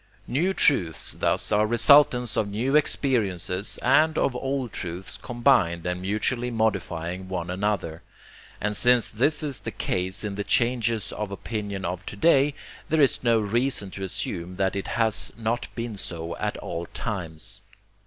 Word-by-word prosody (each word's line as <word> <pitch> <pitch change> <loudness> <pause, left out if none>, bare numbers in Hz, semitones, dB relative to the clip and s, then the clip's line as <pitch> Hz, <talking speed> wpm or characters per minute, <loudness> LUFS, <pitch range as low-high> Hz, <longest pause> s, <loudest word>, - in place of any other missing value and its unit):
New 170 +9 0
truths 90 - +2
thus - - +1
are 105 0 +3
resultants 125 0 +5
of 105 - +1
new 115 +8 -1
experiences 105 - +1
and 155 +5 +4
of 125 - +1
old 135 -2 -3
truths 90 +2 -4
combined 120 -9 +1
and 90 0 -2
mutually 110 +5 -1
modifying 95 -5 -2
one 90 -2 -3
another. 90 -4 -2 0.6
And 105 +1 -1
since 125 0 +4
this 145 +8 +2
is 145 -4 -2
the - - -5
case 95 +2 -2
in 105 -2 -3
the 100 +1 -3
changes 115 -2 +1
of 105 -1 -4
opinion 100 -1 -4
of 90 +2 -4
to - - -6
day, 140 +3 +3 0.3
there 160 - +2
is 140 -3 +3
no 115 -2 +4
reason 110 -1 0
to 95 - -7
assume 90 -1 -4
that 95 0 0
it 100 - -3
has 110 -2 +1
not 115 +1 -2
been 115 -3 -5
so 85 -4 -5
at - - -2
all 85 0 -5
times. 85 -8 -5
105 Hz, 155 wpm, -25 LUFS, 95-125 Hz, 0.6 s, resultants